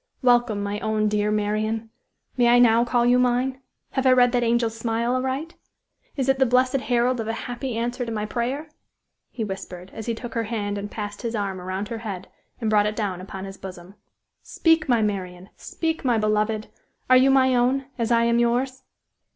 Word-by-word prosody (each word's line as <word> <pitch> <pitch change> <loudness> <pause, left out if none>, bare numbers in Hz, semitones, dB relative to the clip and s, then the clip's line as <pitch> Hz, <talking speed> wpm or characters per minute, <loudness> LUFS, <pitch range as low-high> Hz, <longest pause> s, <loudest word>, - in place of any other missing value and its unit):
Welcome, 240 -4 +3
my 205 +1 -3
own, 215 -1 0
dear 210 0 +1
Marian! 215 +1 -1 0.4
May 245 -2 +3
I 240 +1 +6
now 235 -1 +5
call 240 0 +1
you 245 +1 +4
mine? 250 +2 +1 0.3
Have 265 0 0
I - - +7
read 250 -1 +5
that 245 0 +1
angel 235 -1 +1
smile 230 +1 -1
aright? 265 +5 -2 0.6
Is 270 -3 -1
it 270 0 +2
the 265 - +5
blessed 255 +2 +3
herald 245 +1 +2
of 220 - -3
a 225 - -1
happy 245 -1 -4
answer 240 +2 -2
to 230 - -5
my 210 -1 -2
prayer?" 260 +7 -3 0.6
he 230 - -4
whispered, 190 -2 -7
as 220 - -7
he 230 - -1
took 240 +1 -8
her 230 -1 -1
hand 205 -2 -3
and 205 +1 -5
passed 205 -1 -6
his 235 -2 -3
arm 195 -3 -3
around 185 +3 -4
her 230 - -4
head 200 -5 -6 0.3
and 225 - -2
brought 210 -1 +3
it 210 - -3
down 195 -5 -2
upon 190 0 -7
his 195 0 -9
bosom. 180 0 -10 0.5
"Speak, 325 -3 +1
my 235 -3 +3
Marian! 185 -3 -4
Speak, 320 -1 -3
my 245 -3 +2
beloved! 215 0 0 0.4
Are 255 - +6
you 260 +1 +5
my 260 -1 +4
own, 255 +2 +2
as 230 -1 0
I 230 0 +4
am 235 0 +2
yours?" 250 +2 0
230 Hz, 200 wpm, -24 LUFS, 210-250 Hz, 0.6 s, I